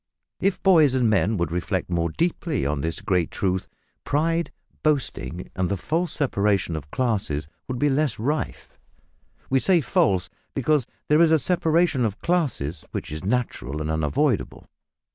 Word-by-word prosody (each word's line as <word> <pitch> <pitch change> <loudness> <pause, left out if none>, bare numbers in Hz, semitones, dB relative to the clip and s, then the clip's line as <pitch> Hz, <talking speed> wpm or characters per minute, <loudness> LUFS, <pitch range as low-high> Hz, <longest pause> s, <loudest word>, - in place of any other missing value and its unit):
If 195 -1 0
boys 160 -8 +5
and 120 -4 +3
men 105 +1 +2
would 85 -3 -1
reflect 90 +1 -2
more 85 -1 +1
deeply 165 - -1
on 70 0 -1
this 80 +2 -3
great 90 -4 +1
truth, 95 -2 -1 0.4
pride, 165 +3 0 0.3
boasting, 125 - -1
and 90 -1 0
the 100 - -1
false 170 - -1
separation 100 - +1
of 75 -2 -6
classes 95 - -1 0.2
would 130 -2 -3
be 145 - +2
less 145 -2 +1
rife. 145 +8 -3 0.7
We 135 - +4
say 180 +4 +4
false, 95 - +2 0.3
because 150 -5 +2 0.2
there 150 +2 +4
is 170 - +6
a 160 - +5
separation 160 -2 +2
of 105 -3 -1
classes 125 - -1
which - - -5
is 75 +2 -5
natural 100 - -2
and 75 0 -2
unavoidable. 75 -2 0
115 Hz, 155 wpm, -24 LUFS, -, 0.7 s, is